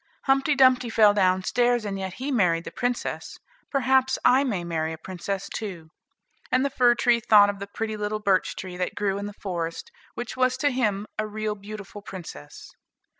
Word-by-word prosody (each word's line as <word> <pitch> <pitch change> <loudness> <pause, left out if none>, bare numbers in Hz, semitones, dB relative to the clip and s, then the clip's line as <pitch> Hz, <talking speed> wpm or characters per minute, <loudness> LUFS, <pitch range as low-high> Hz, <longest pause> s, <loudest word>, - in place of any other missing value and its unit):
Humpty 270 +2 +2
Dumpty 255 -2 +4
fell 215 -2 +5
down 185 -2 +2
stairs, 240 +1 +1
and 195 -1 -3
yet 190 -1 -5
he 265 +6 -4
married 175 -9 +2
the - - -8
princess; 245 -1 -3 0.3
perhaps 265 -1 +2
I 260 +2 +5
may 205 -10 -2
marry 160 -2 -2
a - - -7
princess 185 +3 -5
too." 175 -7 -7 0.6
And 255 +2 +3
the 280 - -1
fir 245 -2 +4
tree 240 0 +3
thought 210 -3 +6
of 200 - -12
the 200 - -6
pretty 220 +2 -4
little 210 0 -2
birch 195 -3 +1
tree 185 -2 -7
that 180 - -3
grew 200 -1 -1
in 200 - -4
the 205 - -9
forest, 175 - -4 0.2
which 240 - -5
was 255 0 +1
to 290 +2 +1
him 210 -6 0
a 215 - 0
real 215 0 -3
beautiful 205 0 -9
princess. 175 - -10
210 Hz, 190 wpm, -25 LUFS, 190-245 Hz, 0.6 s, thought